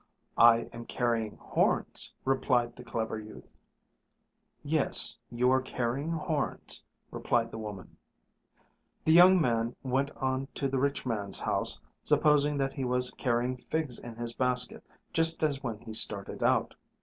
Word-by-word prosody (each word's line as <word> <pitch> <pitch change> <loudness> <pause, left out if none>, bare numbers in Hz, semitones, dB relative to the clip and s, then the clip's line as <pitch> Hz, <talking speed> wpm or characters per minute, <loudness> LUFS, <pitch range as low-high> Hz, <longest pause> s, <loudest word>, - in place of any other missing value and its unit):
"I 115 0 +7
am 115 0 -9
carrying 115 -3 -2
horns," - - 0
replied 125 -3 +1
the 125 - -11
clever 110 -2 -4
youth. 110 0 -13 1.1
"Yes, - - +3
you 125 +2 +1
are 130 0 +3
carrying 130 +3 -3
horns," 155 -3 -2 0.3
replied 115 -1 -1
the - - -7
woman. 105 -4 -9 1.1
The 160 - +4
young 180 +2 +7
man 115 -5 0
went 135 +2 0
on 130 0 -2
to 140 - -1
the 135 0 -1
rich 140 +1 -1
man's 105 -5 0
house - - +2 0.2
supposing 150 -1 +3
that 135 -1 -1
he 135 - -4
was 125 0 0
carrying 125 0 -1
figs 145 -1 -3
in 120 -1 -10
his 120 0 -3
basket 125 0 +1 0.3
just 165 0 +3
as 140 -3 0
when 115 -6 -4
he 110 - -9
started 100 -2 +1
out. - - +1
125 Hz, 145 wpm, -29 LUFS, 115-140 Hz, 1.1 s, I